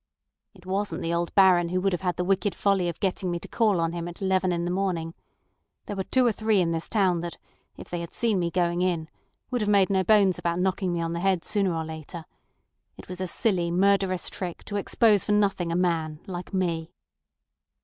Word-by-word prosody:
"It 180 -2 -18
wasn't 190 -2 -2
the 165 - -1
old 170 0 -2
Baron 180 -3 +5
who 185 +1 0
would 195 0 0
have 175 - -2
had 180 -2 -1
the 180 - -1
wicked 195 +2 0
folly 195 -3 +1
of 170 - -7
getting 190 -1 -1
me 175 - -1
to - - -9
call 215 -6 +1
on 165 0 0
him 170 0 -4
at 175 - -9
eleven 190 -1 +1
in 170 0 -1
the 175 - -1
morning. 180 -4 -2 0.7
There 205 - -5
are - - +1
two 255 +6 +2
or 235 - +4
three 215 -1 +1
in 170 -2 +1
this 165 0 -2
town 190 -6 +2
that, 170 0 -6 0.4
if - - -10
they 175 - -4
had 170 0 -6
seen 225 -5 +1
me 170 -1 0
going 175 0 0
in, 170 -3 -1 0.4
would 245 -2 0
have 210 - 0
made 200 -1 +4
no 190 -1 +2
bones 200 -2 +4
about 170 0 -1
knocking 185 0 0
me 170 -1 -1
on 165 0 -2
the 170 - -3
head 190 -1 +1
sooner 195 -5 +1
or 160 0 -3
later. 160 +1 -8 0.7
It - - -13
was 180 0 -6
a 185 - -1
silly, 180 -3 +1
murderous 190 0 +2
trick 180 -3 -5
to 205 - -3
expose 210 0 +3
for 210 - 0
nothing 195 -4 +1
a - - -1
man—like 170 0 -2
me." 170 -4 -1
180 Hz, 225 wpm, -26 LUFS, 170-195 Hz, 0.7 s, Baron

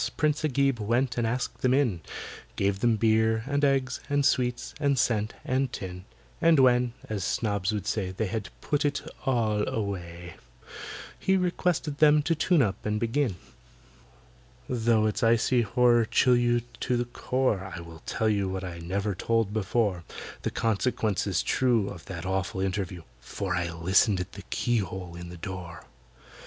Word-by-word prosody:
PRINCE 150 0 +1
AGIB 140 -3 +2
went 120 +4 +1
and 115 - +1
asked 125 +2 -2
them 130 0 +3
in; 120 -12 +1 0.5
Gave 100 0 0
them 120 +1 +3
beer, 110 0 +2
and 145 +1 -1
eggs, 135 -2 +2
and 145 -1 +2
sweets, 125 -2 +1
and 140 -2 +2
scent, 110 -3 +1
and 130 -2 0
tin. 90 -3 -6 0.4
And 165 -1 +5
when 125 -2 +4
(as 105 -3 -3
snobs 100 -1 0
would 105 -3 -3
say) 105 -3 -1
They 95 +4 -2
had 110 0 -3
"put 145 -1 0
it 145 -1 0 0.2
all 110 -5 +2
away," 90 -5 -5 0.8
He 190 0 +2
requested 175 -4 0
them 150 -1 +6
to 165 - +2
tune 160 -1 +3
up 100 -3 -2
and 105 0 -1
begin. 115 -1 0 1.3
Though 115 -3 +2
its 110 +2 -1
icy 115 +2 +3
horror 120 +1 +3
chill 125 +3 +4
you 120 0 +2 0.2
to 125 -1 0
the 120 - 0
core, 120 -6 -1
I - - -6
will 85 -2 -11
tell 110 - 0
you 100 -3 +1
what 95 0 -4
I 85 -2 -6
never 100 +5 -2
told 115 +2 0
before,— 105 -3 0 0.4
The - - -1
consequences 105 -3 0
true 120 -6 +2
Of 85 - -9
that 90 -3 -6
awful 95 0 -2
interview, 95 -2 -2 0.2
For 90 +9 -4
I 85 -1 -1
listened 95 +4 +3
at 90 +1 -4
the 100 - -9
keyhole 95 -7 -1
in 85 0 -8
the 90 - -9
door! 90 -1 -7
110 Hz, 165 wpm, -27 LUFS, 95-125 Hz, 1.3 s, them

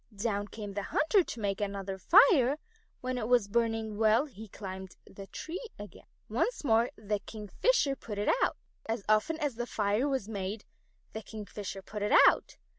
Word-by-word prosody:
Down 205 -1 -1
came 205 -1 -7
the 205 - -2
hunter 340 - +2
to 240 - -7
make 200 -1 -1
another 195 -1 -3
fire. 300 - +6 0.4
When 255 0 -2
it 215 - -2
was 240 -4 +3
burning 225 -1 -1
well 220 +5 +4
he 220 -7 -11
climbed 190 -2 -8
the 195 0 -11
tree 340 - -6
again. 205 0 -11 0.2
Once - - -1
more 230 -2 +3
the 210 -1 -2
Kingfisher 270 - 0
put 215 -5 -7
it 205 - +2
out. - - +1 0.3
As 225 -2 -2
often 215 +10 +2
as 285 -6 -2
a 240 - -2
fire 210 +6 0
was 265 -7 -1
made, 205 0 -4 0.5
the 220 - -5
Kingfisher 205 -2 -7
put 210 +2 -7
it 205 - +1
out. - - +1
215 Hz, 175 wpm, -30 LUFS, 205-250 Hz, 0.5 s, fire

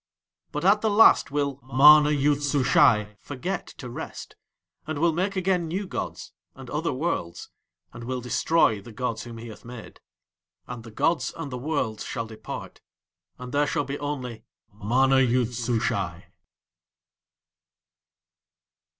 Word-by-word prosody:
But 150 +4 -3
at 205 +2 +5
the 220 - +1
Last 210 +2 +6
will 140 -1 -2
MANA 150 +4 +7
YOOD 145 0 +2
SUSHAI 120 -7 +3
forget 170 +7 -5
to 125 - -8
rest, 120 - -8 0.5
and 155 -1 -3
will 165 +2 +2
make 190 +4 -1
again 185 -2 0
new 190 +5 -3
gods - - -6 0.2
and 130 -2 -11
other 155 +3 -1
worlds, 130 - -3 0.4
and 115 0 -9
will 130 +1 -3
destroy 125 -2 +2
the 115 - -12
gods 120 0 -3
whom 115 -1 -9
he 115 +1 -9
hath 110 - -12
made. 120 -1 -11 0.7
And 120 -2 -8
the 115 - -11
gods 155 +9 0
and 160 -4 -6
the 125 - -4
worlds 125 -6 -2
shall 115 - -4
depart, 110 -1 -9 0.6
and 125 0 -8
there 145 +1 +2
shall 145 - -1
be 140 +2 -5
only 130 -6 -5 0.3
MANA 130 +6 +2
YOOD 125 -1 +2
SUSHAI. 120 -1 -2
135 Hz, 140 wpm, -25 LUFS, 120-150 Hz, 0.7 s, MANA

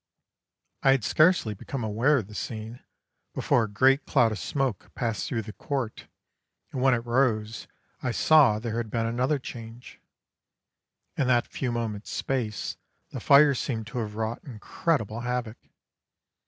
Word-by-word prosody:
I 135 - +5
had 135 -5 0
scarcely 155 - +3
become 120 +5 -6
aware 115 +8 +2
of 115 - -2
the 105 - -13
scene 110 +2 -6 0.6
before 115 - +2
a - - -8
great 130 +7 +3
cloud 115 -2 +3
of 110 - -4
smoke 135 -7 -2
passed 115 -3 -2
through 115 -3 -2
the 105 +1 -9
court, 130 -3 -4 0.6
and 130 - -3
when 130 -1 +4
it 115 0 -4
rose 120 -3 0 0.3
I 125 - -1
saw 135 -2 +5
there 115 +1 -4
had 115 -2 -3
been 115 +1 -1
another 125 +6 0
change: 120 -2 -10 1.1
in 135 - 0
that 120 -2 +3
few 130 -3 -3
moments' 110 -3 -4
space 120 -6 -3 0.3
the - - -5
fire 140 0 +6
seemed 115 -3 -3
to 125 - -2
have 105 -2 -4
wrought 110 +1 -3
incredible 115 -1 -2
havoc. 125 -1 -3
120 Hz, 155 wpm, -27 LUFS, 110-130 Hz, 1.1 s, fire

